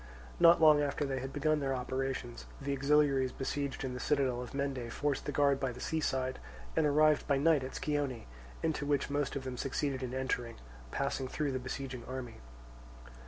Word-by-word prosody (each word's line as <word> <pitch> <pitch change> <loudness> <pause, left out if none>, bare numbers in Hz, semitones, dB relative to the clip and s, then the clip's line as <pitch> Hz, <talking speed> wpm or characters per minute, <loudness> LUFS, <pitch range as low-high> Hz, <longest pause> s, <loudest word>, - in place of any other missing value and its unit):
Not 170 0 +7
long 155 -2 +7
after 145 0 0
they 135 -1 -2
had 135 +1 -5
begun 155 +1 +1
their 135 -2 0
operations, 130 -1 -3
the 140 0 -2
auxiliaries 140 -2 +3
besieged 140 +1 -3
in 130 -1 -3
the 125 - -5
citadel 130 -3 +1
of 125 +2 -8
Mende 135 -4 -2
forced 145 +1 -1
the 145 - -2
guard 140 -1 +3
by 135 -2 -1
the 125 - -10
sea 160 +4 -1
side 130 -3 -1 0.4
and 150 - +3
arrived 150 +1 +4
by 140 -2 +3
night 150 -1 +3
at 130 - -6
Scione, 145 -6 -2 0.4
into 160 -2 0
which 145 -1 +1
most 145 -1 -1
of 140 - -3
them 130 -1 -5
succeeded 135 0 -1
in 130 0 -4
entering, 125 -3 -2 0.3
passing 140 - -2
through 145 +2 -1
the 130 - -2
besieging 130 -1 -5
army. 130 -3 -6
135 Hz, 190 wpm, -33 LUFS, 130-145 Hz, 0.4 s, Not